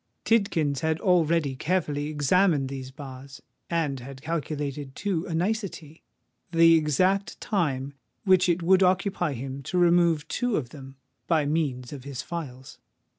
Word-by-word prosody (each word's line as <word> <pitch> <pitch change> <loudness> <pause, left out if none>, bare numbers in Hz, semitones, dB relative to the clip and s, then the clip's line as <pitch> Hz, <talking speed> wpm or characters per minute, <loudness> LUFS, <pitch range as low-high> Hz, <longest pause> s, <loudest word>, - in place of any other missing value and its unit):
Tidkins 165 -11 +2
had 160 +1 0
already 165 -6 +2
carefully 150 -2 -1
examined 150 0 +2
these 135 -1 -6
bars, 135 -1 -10 0.3
and 155 -6 -1
had 130 +2 -9
calculated 145 -3 -4
to 185 -4 -2
a 165 - -3
nicety 175 -4 -3 0.5
the 165 -1 +6
exact 185 +6 +1
time 140 - -1 0.3
which 185 -3 +4
it 170 0 +1
would 190 +2 +4
occupy 180 -3 +1
him 135 +2 -6
to 160 +7 -3
remove 170 -3 +3
two 245 +3 -1
of 125 -6 -3
them 135 -1 -11 0.3
by 160 -3 +2
means 145 -5 -1
of 135 -3 -8
his 135 -2 -6
files. 135 -7 -7
155 Hz, 140 wpm, -26 LUFS, 140-175 Hz, 0.5 s, the